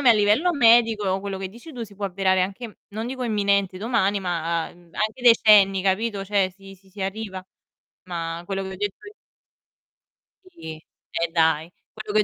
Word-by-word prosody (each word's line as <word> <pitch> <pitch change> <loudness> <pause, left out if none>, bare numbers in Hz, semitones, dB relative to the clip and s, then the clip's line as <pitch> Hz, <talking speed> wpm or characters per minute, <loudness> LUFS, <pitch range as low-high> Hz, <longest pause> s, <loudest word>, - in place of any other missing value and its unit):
me 260 -4 +6
a - - +9
livello 215 +11 +3
medico 225 - +4
quello 200 0 -4
che 190 0 -4
dici 235 - -13
tu 245 -3 -6
si 205 -3 -10
può 200 +1 -5
avverare 190 0 +1
anche 205 +4 -5
non 220 +3 -5
dico 255 0 -5
imminente, 200 -4 +1
domani, 205 -3 +1
ma 170 -2 -1
anche 210 +8 -5
decenni, 210 -5 +6
capito, 200 +1 0
cioè 195 -1 +1
si 195 +1 -14
si 190 +1 -24
si 200 +1 -7
arriva. 195 -1 -5 0.6
Ma 170 -1 -4
quello 195 0 -3
che 190 - -6
ho - - -8
detto 205 0 -3
io 415 - -11 1.4
sì, 335 - -8
e 165 +1 -6
dai! 160 -1 +2 0.2
Quello 215 -1 -7
che 215 - +4
200 Hz, 175 wpm, -23 LUFS, 185-220 Hz, 1.4 s, a